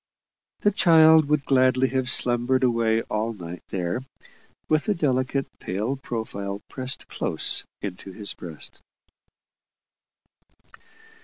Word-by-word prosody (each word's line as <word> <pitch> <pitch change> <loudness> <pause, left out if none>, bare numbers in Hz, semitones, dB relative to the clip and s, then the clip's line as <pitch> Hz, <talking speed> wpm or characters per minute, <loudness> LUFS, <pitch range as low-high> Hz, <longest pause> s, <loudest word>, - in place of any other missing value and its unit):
The 205 - +4
child 160 -5 +6
would 150 -1 +1
gladly 130 -1 +3
have 130 -1 -1
slumbered 125 0 +1
away 115 -2 +2
all 110 +2 -2
night 90 -4 -8
there, 90 +4 -2 0.7
with 155 0 +2
the 210 - +1
delicate, 135 -3 0
pale 105 +9 -2
profile 100 -6 -5
pressed 130 0 -4
close - - -1 0.2
into 95 -1 -6
his 100 +2 -4
breast. 80 -4 -10
125 Hz, 105 wpm, -25 LUFS, 105-135 Hz, 0.7 s, child